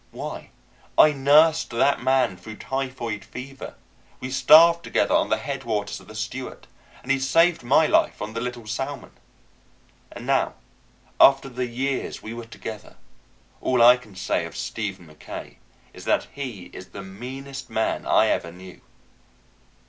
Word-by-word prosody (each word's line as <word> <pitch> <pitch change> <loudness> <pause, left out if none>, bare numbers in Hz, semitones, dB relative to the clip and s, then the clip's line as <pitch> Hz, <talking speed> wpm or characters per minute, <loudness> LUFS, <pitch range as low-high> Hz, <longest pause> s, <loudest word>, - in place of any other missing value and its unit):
Why, - - -7 0.5
I 155 - +7
nursed 150 +4 +4
that 135 +4 +1
man 130 -5 +2
through 105 +5 -10
typhoid 130 -5 -4
fever; 135 +5 -9 0.4
we 130 - -6
starved 160 +6 +6
together - - 0
on - - +2
the - - +2
headwaters 110 -7 -3
of - - -17
the 110 - -12
Stewart; 120 +4 -6 0.4
and 135 - -2
he 135 - +2
saved 165 +6 +3
my 135 +6 +4
life - - +2
on 105 +1 -5
the 115 - -3
Little 125 -1 -5
Salmon. 135 +6 -5 1.0
And - - -9
now, - - +1 0.6
after 135 0 +6
the 125 0 -3
years 130 +3 -3
we 110 - -6
were 120 0 -7
together, 110 -2 -9 0.7
all 125 -2 +3
I 120 +1 +9
can 110 -6 -14
say 95 - -1
of - - -9
Stephen 100 -5 -4
Mackaye 75 -1 -10 0.4
is - - -12
that - - +1
he 115 -11 -7
is 90 - -10
the 100 - -9
meanest 135 +7 -8
man 110 - -1
I - - +4
ever 85 - -1
knew. 90 +1 -13
125 Hz, 155 wpm, -24 LUFS, 110-135 Hz, 1.0 s, I